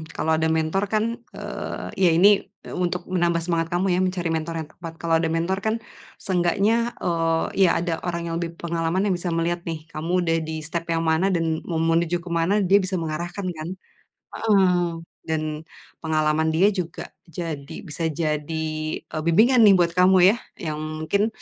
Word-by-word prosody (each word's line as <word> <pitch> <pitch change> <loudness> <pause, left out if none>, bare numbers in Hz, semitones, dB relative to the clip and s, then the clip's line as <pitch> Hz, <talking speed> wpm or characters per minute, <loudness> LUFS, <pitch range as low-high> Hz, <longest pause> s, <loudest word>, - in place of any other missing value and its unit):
Kalau 160 - 0
ada 160 - +1
mentor 160 +4 +1
kan, 215 - +3 0.3
eee, - - -5 0.2
ya 180 - +7
ini 185 +5 +7 0.5
untuk 180 0 -1
menambah 175 -2 +1
semangat 165 -1 0
kamu 180 +2 +1
ya - - +1
mencari 180 -2 -1
mentor 165 +1 -2
yang 155 -1 -6
tepat. 165 -1 -9
Kalau 165 -1 +2
ada 165 - 0
mentor 170 +4 0
kan 220 0 +2 0.4
seenggaknya, 200 +6 +1
eee, 165 -1 +1 0.2
ya 185 - +6
ada 170 -1 -2
orang 170 -1 -3
yang - - -2
lebih 170 -1 -4
pengalaman 170 +2 -1
yang 190 - +2
bisa 175 +1 -5
melihat 170 +1 0
nih 160 -2 -4
kamu 160 +3 -4
udah 165 -1 +1
di 160 0 -4
step 165 +2 -4
yang 165 0 +1
mana 160 +3 +2
dan 165 -2 0
mau 165 -2 -1
menuju 165 +1 +2
ke 180 - -9
mana 170 +5 +2
dia 195 +2 +5
bisa 190 -1 -2
mengarahkan 170 +4 -4
kan. 155 +2 -5 0.7
Heeh, 185 -5 +3 0.4
dan 155 -1 -2 0.4
pengalaman 155 0 +1
dia 185 +6 +4
juga 180 -4 -5 0.2
jadi 160 -4 -6
bisa 160 +2 -3
jadi, 155 0 -2 0.4
eee, 155 - -5
bimbingan 230 +9 +5
nih 205 -2 +8
buat 170 -2 +2
kamu 185 +1 +6
ya 220 - +1 0.2
yang 155 -3 -3 0.3
mungkin 200 +6 +2
170 Hz, 175 wpm, -24 LUFS, 160-180 Hz, 0.7 s, nih